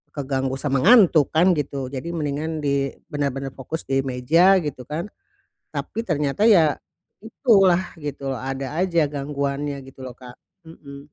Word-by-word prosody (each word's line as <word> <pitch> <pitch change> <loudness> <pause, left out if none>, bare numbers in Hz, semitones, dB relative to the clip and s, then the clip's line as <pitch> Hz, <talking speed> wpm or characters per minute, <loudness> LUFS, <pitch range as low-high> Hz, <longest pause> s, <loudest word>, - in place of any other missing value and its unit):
keganggu 135 -2 -2
sama 135 -1 -1
ngantuk, 185 - +6
kan 180 +3 +5
gitu. 135 -2 -4
Jadi, 135 +4 -6
mendingan 155 +1 -3
di 140 -1 0 0.2
benar-benar 135 -2 -2
fokus 160 +5 -5
di 135 0 0
meja, 155 +9 +3
gitu 130 -4 -6
kan. 165 +7 -5 0.6
Tapi 225 +1 -4
ternyata, 150 +3 -1
ya, 165 -9 +5 0.5
itu 230 +1 0
lah, 180 +1 +3 0.2
gitu 140 -2 -5
loh. 130 - -3
Ada 135 +3 -4
aja 175 -3 +1
gangguannya, 140 0 -3
gitu 135 0 -15
loh, 125 - -9
Kak. 125 -1 -13 0.3
Mhm. 140 -3 -12
145 Hz, 150 wpm, -22 LUFS, 135-160 Hz, 0.6 s, ngantuk